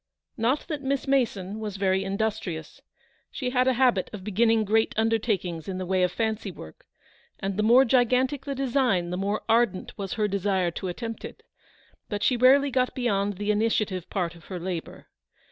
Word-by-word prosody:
Not 250 +4 0
that 300 -4 -4
Miss 275 0 -1
Mason 220 -7 0
was 210 -3 -5
very 190 0 +1
industrious. 195 -5 -3 0.5
She 250 -2 -3
had 255 0 +2
a 260 - +4
habit 245 -6 +2
of 210 -3 -8
beginning 220 +2 +2
great 220 +2 +2
undertakings 210 -7 0
in 190 -1 -3
the 185 - -4
way 185 +1 +1
of 180 -1 +2
fancy 220 -1 -2
work, 80 - -12 0.5
and 195 0 -3
the 210 - 0
more 240 +5 +6
gigantic 255 +2 +2
the 280 -1 -3
design 245 -10 +1
the - - -1
more 200 +3 -1
ardent 225 -4 +1
was 195 +3 -3
her 215 -3 0
desire 190 -3 0
to 185 - -5
attempt 225 +5 -5
it - - -9 0.3
— - - -33
but 205 0 -3
she 255 - +3
rarely 270 +3 +5
got 255 0 0
beyond 205 -5 0
the 205 +1 0
initia 215 +1 +2
tive 185 -3 -6
part 180 -4 -2
of 170 -1 -16
her 185 -2 -6
labour. 175 -1 -5
215 Hz, 190 wpm, -26 LUFS, 190-245 Hz, 0.5 s, more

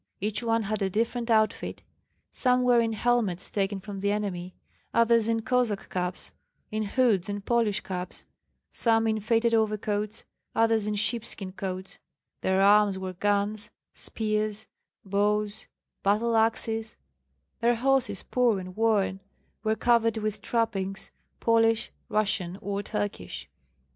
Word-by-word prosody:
Each 210 +1 0
one 230 -1 +1
had 215 +1 -2
a 195 - +1
different 230 +4 -1
outfit: 220 -1 +1 0.5
some 250 -1 +2
were 245 -1 +5
in 225 -1 +1
helmets 220 -5 +1
taken 195 -1 -1
from 195 +1 -7
the 200 +1 +1
enemy; 185 -4 -3 0.4
others 230 -1 +4
in 225 -1 0
Cossack 245 -4 0
caps, 180 -1 -3 0.4
in 215 0 -1
hoods 215 -3 +2
and 205 0 -4
Polish 225 -4 +1
caps; 180 -2 -6 0.5
some 225 -1 +2
in 220 -1 +1
faded 230 +2 +2
overcoats, 215 -1 0 0.3
others 225 -2 +3
in 210 - 0
sheep 215 +2 +1
skin 195 -5 -4
coats; 190 0 -6 0.4
their 190 0 +2
arms 205 -1 +5
were 190 -1 -5
guns, 205 +2 0 0.2
spears, 215 -1 -2 0.4
bows, 205 +1 0 0.3
battle 220 +4 +2
axes; 225 0 0 0.6
their 235 +1 +3
horses, 265 +2 +1
poor 240 -5 +2
and 185 0 -8
worn, 215 -4 +2 0.4
were 220 0 +1
covered 230 -1 +3
with 215 -1 -2
trappings, 195 -4 -1 0.3
Polish, 225 -1 +3 0.2
Russian, 195 -4 0
or 200 -1 -3
Turkish. 205 0 -4
215 Hz, 135 wpm, -27 LUFS, 200-230 Hz, 0.6 s, were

